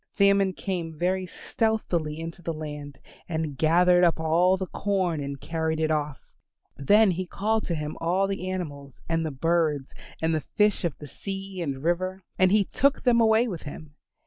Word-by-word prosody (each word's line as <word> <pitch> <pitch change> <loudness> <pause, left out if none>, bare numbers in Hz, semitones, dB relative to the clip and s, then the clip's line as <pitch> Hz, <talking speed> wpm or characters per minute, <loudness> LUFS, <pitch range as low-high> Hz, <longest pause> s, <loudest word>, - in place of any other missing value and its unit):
Famine 200 -1 +4
came 170 -4 -4
very 185 +2 0
stealthily 175 -8 -1
into 165 +2 -7
the 165 -1 -3
land 150 -2 -7 0.3
and 160 -3 -2
gathered 175 +4 +4
up 170 -2 +3
all 170 +4 +3
the 190 - -3
corn 185 -3 -1
and 140 0 -5
carried 160 0 -2
it 160 0 +1
off; 150 -2 -2 0.5
then 205 +9 +4
he 185 +1 -3
called 215 +4 -1
to 170 - -1
him 150 0 -4
all 180 +4 +2
the 195 -2 -3
animals, 145 -8 -6
and 165 0 0
the 160 - -1
birds, 155 -1 0 0.3
and 160 0 +1
the 155 - 0 0.2
fish 210 -1 +3
of 170 -5 -2
the 150 - -9
sea 195 +3 -6
and 140 -4 -3
river, 185 +3 -1 0.2
and 185 0 +5
he 210 0 +5
took 275 +8 +1
them 235 -2 +4
away 225 +2 +4
with 180 -8 -5
him. 150 0 -9
170 Hz, 180 wpm, -26 LUFS, 155-195 Hz, 0.5 s, and